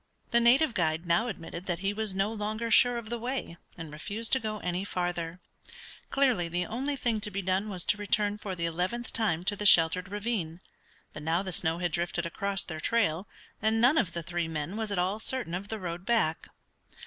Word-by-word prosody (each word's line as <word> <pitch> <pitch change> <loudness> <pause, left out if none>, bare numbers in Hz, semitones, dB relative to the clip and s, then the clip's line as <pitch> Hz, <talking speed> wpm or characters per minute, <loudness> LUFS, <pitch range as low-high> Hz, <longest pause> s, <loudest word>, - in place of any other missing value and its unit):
The 235 - +5
native 245 +4 +4
guide 160 -2 0
now 170 +7 +2
admitted 175 -3 -6
that 175 -2 0
he 200 +1 0
was 215 -2 -2
no 195 +3 0
longer 215 +2 -3
sure 245 0 +5
of 230 -1 -7
the 235 - -2
way, 245 -7 -4 0.2
and 165 -3 -7
refused 205 +9 -2
to 265 - +6
go 215 -3 -3
any 180 +1 -2
farther. 175 -3 -3 0.7
Clearly 255 -11 +2
the 175 +1 -1
only 270 +8 -2
thing 235 -5 -1
to 210 - -2
be 195 -1 -3
done 190 +3 0
was 185 -4 -1
to 210 - +3
return 205 0 0
for 195 -2 -4
the 170 -1 -2
eleventh 180 +9 -2
time 190 -7 +1
to 205 +2 +2
the 210 - -5
sheltered 180 +2 +6
ravine. 200 -6 -3 0.5
But 150 - -8
now 165 +4 +1
the 190 - -4
snow 165 -1 +3
had 175 -1 -1
drifted 175 +1 -1
across 195 +3 -2
their 160 -2 -6
trail, 190 -2 +1 0.3
and 220 +1 +2
none 255 +7 +5
of 180 -7 -1
the 170 - -4
three 175 0 -2
men 160 +3 -4
was 220 -1 -3
at 200 - -1
all 185 +4 0
certain 245 -6 -1
of 190 +3 -3
the 220 - -4
road 175 -2 -5
back. 190 -8 +1
195 Hz, 215 wpm, -29 LUFS, 170-220 Hz, 0.7 s, to